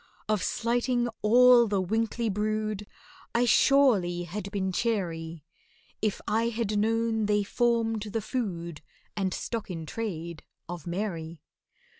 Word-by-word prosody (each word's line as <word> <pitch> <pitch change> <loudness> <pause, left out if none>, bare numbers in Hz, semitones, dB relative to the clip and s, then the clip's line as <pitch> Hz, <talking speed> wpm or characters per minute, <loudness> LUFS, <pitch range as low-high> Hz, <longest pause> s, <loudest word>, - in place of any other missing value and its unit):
Of 215 -3 +1
slighting 240 +4 0
all 240 +2 +6
the 200 -2 0
winkly 225 +4 -1
brood 215 0 -2 0.5
I 240 +1 +4
surely 220 -10 +4
had 200 +3 -5
been 195 -2 -2
chary, 170 -8 -2 0.6
If 215 -2 -1
I 225 +2 +1
had 220 -3 -1
known 225 0 +1
they 205 0 +2
formed 230 0 +1
the 215 +1 -3
food 170 - -4 0.3
And 195 -2 -1
stock 225 +3 -4
in 165 -3 -5
trade 170 -5 -5 0.3
of 175 -2 -7
MARY. 170 -4 -4
210 Hz, 125 wpm, -28 LUFS, 180-230 Hz, 0.6 s, all